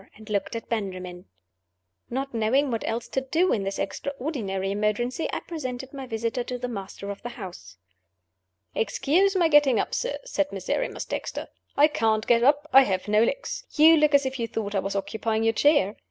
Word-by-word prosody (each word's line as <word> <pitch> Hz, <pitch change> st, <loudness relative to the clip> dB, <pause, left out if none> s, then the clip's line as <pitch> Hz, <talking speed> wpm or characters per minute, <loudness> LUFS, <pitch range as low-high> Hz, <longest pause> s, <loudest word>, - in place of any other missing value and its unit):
and 215 Hz, 0 st, -11 dB
looked 205 Hz, +2 st, -1 dB
at 230 Hz, -, -5 dB
Benjamin. 185 Hz, -5 st, -4 dB, 0.8 s
Not 270 Hz, +2 st, -3 dB
knowing 245 Hz, +5 st, +2 dB
what 230 Hz, -, -1 dB
else 230 Hz, +1 st, -2 dB
to 265 Hz, -, -1 dB
do 325 Hz, +8 st, +1 dB
in 210 Hz, -, 0 dB
this 195 Hz, 0 st, -3 dB
extraordinary 240 Hz, -10 st, -3 dB
emergency, 215 Hz, +8 st, -1 dB
I -, -, -3 dB
presented 265 Hz, -5 st, -6 dB
my 270 Hz, -2 st, -7 dB
visitor 230 Hz, +1 st, -2 dB
to 250 Hz, -, -4 dB
the 250 Hz, 0 st, -4 dB
master 200 Hz, -3 st, -6 dB
of 200 Hz, -, -8 dB
the 240 Hz, -, -5 dB
house. 190 Hz, -, -10 dB, 1.0 s
"Excuse 310 Hz, -, +2 dB
my 350 Hz, -3 st, +4 dB
getting 295 Hz, -6 st, +5 dB
up, -, -, -2 dB
sir," -, -, -1 dB
said 295 Hz, -12 st, -1 dB
Miserrimus 195 Hz, -, -2 dB
Dexter. -, -, -5 dB, 0.3 s
"I 290 Hz, +2 st, +7 dB
can't 220 Hz, -6 st, +1 dB
get 235 Hz, -1 st, +4 dB
up 290 Hz, +4 st, +3 dB
I 270 Hz, -, +10 dB
have 190 Hz, -7 st, -1 dB
no 210 Hz, +1 st, +4 dB
legs. -, -, -2 dB
You 320 Hz, +1 st, +7 dB
look 300 Hz, -2 st, +4 dB
as 280 Hz, -1 st, +4 dB
if 265 Hz, 0 st, -3 dB
you 230 Hz, -, -1 dB
thought 210 Hz, -2 st, -4 dB
I 200 Hz, -, +2 dB
was 195 Hz, +1 st, -3 dB
occupying 220 Hz, +3 st, -1 dB
your 225 Hz, 0 st, +3 dB
chair? 225 Hz, -6 st, +3 dB
235 Hz, 190 wpm, -26 LUFS, 210-280 Hz, 1.0 s, I